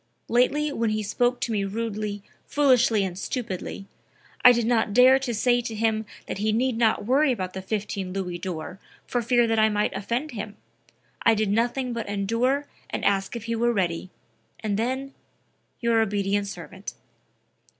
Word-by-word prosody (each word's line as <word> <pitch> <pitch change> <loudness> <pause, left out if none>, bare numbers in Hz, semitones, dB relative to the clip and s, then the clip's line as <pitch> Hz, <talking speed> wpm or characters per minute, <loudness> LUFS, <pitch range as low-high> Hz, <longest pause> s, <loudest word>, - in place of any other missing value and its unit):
Lately 285 +5 +2
when 230 -3 0
he 215 0 -1
spoke 245 +4 +1
to 235 - -1
me 205 -2 0
rudely, 210 0 -3 0.2
foolishly 250 -7 +3
and 185 -2 -3
stupidly, 195 -5 -4 0.6
I 250 - +10
did 235 -2 +1
not 225 -3 +1
dare 255 +2 +7
to 265 -2 -3
say 240 +2 +2
to 230 -2 -5
him 220 0 0 0.2
that - - -5
he 215 +1 +1
need 245 +3 +1
not 225 -3 +2
worry 270 +4 +3
about 185 -6 -3
the 190 - -5
15 200 -1 -3
Louis 180 -2 -3
d'Or 180 +1 -5 0.3
for 245 - -1
fear 240 +1 +3
that 225 -1 +1
I 220 0 +5
might 210 0 0
offend 235 +9 -2
him. 210 -2 -6 0.6
I 225 - +5
did 215 -2 0
nothing 240 +3 0
but 230 -3 -4
endure 230 +8 0 0.2
and - - -3
ask 195 +2 +1
if 235 - -5
he 230 0 -2
were 240 +1 +2
ready; 180 -3 -1 0.5
and 210 -2 -1
then 260 +5 -2 0.7
your 230 -1 +3
obedient 200 -1 0
servant." 190 +1 -8
220 Hz, 170 wpm, -25 LUFS, 200-245 Hz, 0.7 s, I